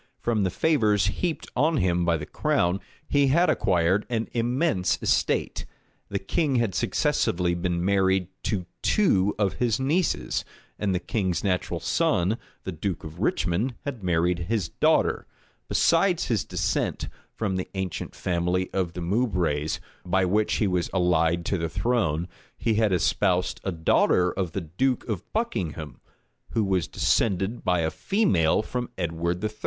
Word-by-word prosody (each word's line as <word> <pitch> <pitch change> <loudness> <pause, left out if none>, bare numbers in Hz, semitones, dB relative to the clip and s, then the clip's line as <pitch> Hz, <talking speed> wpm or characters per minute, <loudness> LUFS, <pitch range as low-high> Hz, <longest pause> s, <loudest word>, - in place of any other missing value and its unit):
From 115 -3 0
the 95 - +2
favors 105 - +2 0.2
heaped 175 -3 -1
on 155 +5 +2
him 90 -5 +1
by 85 -1 +2
the 75 - -6
crown 90 +4 0 0.3
he 140 -1 +3
had 170 +7 +4
acquired 90 +2 +1
an 115 -2 -1
immense 120 - +1
estate: - - 0 0.4
the 100 - -1
king 135 - 0
had 115 -5 +1
successively 90 0 +1
been 85 0 -1
married 95 -2 +2 0.2
to 95 -5 -1 0.2
two 100 - +2
of 100 -3 +1
his 120 -2 +2
nieces; 155 +7 0 0.4
and 100 -3 0
the - - +1
king's 95 -5 -1
natural 90 -3 -1
son, 95 +6 +1 0.2
the 95 - -4
duke 90 +1 -3
of 80 +2 -9
Richmond, 100 +9 0
had 130 -8 -5
married 90 0 +1
his 105 -8 0
daughter; - - +2 0.4
besides 175 +1 +3
his 110 -6 0
descent, - - -1 0.3
from 100 -4 -1
the 90 - -3
ancient 95 -2 -4
family 90 +1 -1
of 90 -3 -1
the 90 - -6
Moubrays, 85 -7 0 0.2
by 95 +1 +1
which 105 +4 +1
he 110 - +1
was 90 -3 0
allied 85 -2 +2
to 95 - 0
the 80 0 -2
throne, 85 -7 0 0.3
he 115 - 0
had 110 -1 +2
espoused 90 0 +1
a 95 - -1
daughter 90 +2 +3
of 90 -4 -3
the 95 - -2
duke 120 - -1
of 105 -4 -4
Buckingham, 80 - -3 0.5
who 110 - +2
was 95 -4 0
descended 100 +2 0
by 90 -2 +2
a 80 -1 0
female 105 - +2
from 125 +2 -4
Edward 85 +1 -2
III. 110 - 0
95 Hz, 155 wpm, -26 LUFS, 85-115 Hz, 0.5 s, had